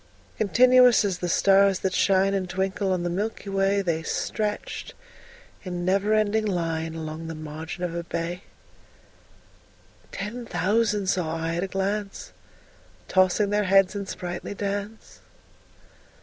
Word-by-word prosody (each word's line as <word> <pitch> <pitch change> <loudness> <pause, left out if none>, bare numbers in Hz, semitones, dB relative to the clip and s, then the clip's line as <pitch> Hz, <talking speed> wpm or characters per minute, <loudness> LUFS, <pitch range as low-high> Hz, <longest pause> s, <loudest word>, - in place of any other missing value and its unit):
Continuous 250 +2 +5
as 190 -3 -2
the 175 - -2
stars 195 +1 +4
that 190 -1 -1
shine 195 0 +3
And 190 -2 -2
twinkle 190 +1 -1
on 180 -2 0
the 175 - -1
milky 200 +2 -3
way, 195 +1 +1
They 165 -3 -1
stretched 210 +5 -3 0.7
in 180 -2 -4
never 200 +3 +2
ending 215 0 +1
line 165 -3 -2
Along 160 0 -6
the 165 - -5
margin 155 +3 -7
of 175 -2 -2
a 170 0 -3
bay: 170 +2 -4 1.7
10 205 +3 -5
Ten 245 -1 -7
thousand 205 +3 +1
saw 175 -4 0
I 165 +1 -2
at 175 - -1
a - - -2
glance, 195 +1 -3 0.7
Tossing 185 +2 +2
their 210 0 +1
heads 195 0 +4
in 200 -1 -5
sprightly 175 +2 -5
dance. 205 +2 -5
195 Hz, 140 wpm, -25 LUFS, 175-205 Hz, 1.7 s, Continuous